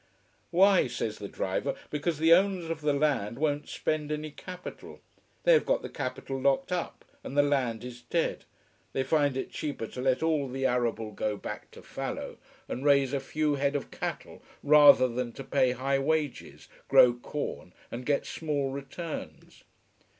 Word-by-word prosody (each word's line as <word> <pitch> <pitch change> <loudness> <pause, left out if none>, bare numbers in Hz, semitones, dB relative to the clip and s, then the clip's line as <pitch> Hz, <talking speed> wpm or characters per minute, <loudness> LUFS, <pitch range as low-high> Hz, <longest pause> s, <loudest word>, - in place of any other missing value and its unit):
Why, 190 -2 +5
says 115 -3 -4
the 100 - -5
driver, - - -2 0.2
because 150 +2 -1
the 160 +2 +6
owners 185 -2 +2
of 160 -1 -4
the 150 0 +2
land 140 -7 0
won't 145 0 -1
spend 155 -1 -2
any 150 0 -3
capital. 180 +4 -9 0.4
They - - +6
have 470 - +5
got - - 0
the - - -5
capital 135 -1 -4
locked 140 +7 +2
up, 180 -1 -3 0.2
and 140 - -6
the 145 - +6
land 130 -6 0
is 125 -1 -8
dead. 160 +8 -1 0.5
They 135 - 0
find 145 -1 +2
it - - -4
cheaper 145 -7 -4
to 125 - -7
let 130 +3 +1
all 155 -4 +1
the 135 +1 -2
arable 120 -3 0
go 105 0 -2
back - - -7
to - - -14
fallow, - - -5 0.3
and 130 - -4
raise 140 -2 +4
a 140 - +1
few 150 +2 -1
head 140 0 0
of 145 - -3
cattle, - - -5 0.2
rather 145 -3 +8
than 120 -1 -3
to 135 - -8
pay 130 -1 +2
high 135 +2 0
wages, 150 -1 -2 0.2
grow 120 - +7
corn, 120 -6 -5 0.2
and 120 +2 -5
get 140 +2 0
small 145 -4 -2
returns. 140 +4 -7
140 Hz, 170 wpm, -29 LUFS, 125-155 Hz, 0.5 s, rather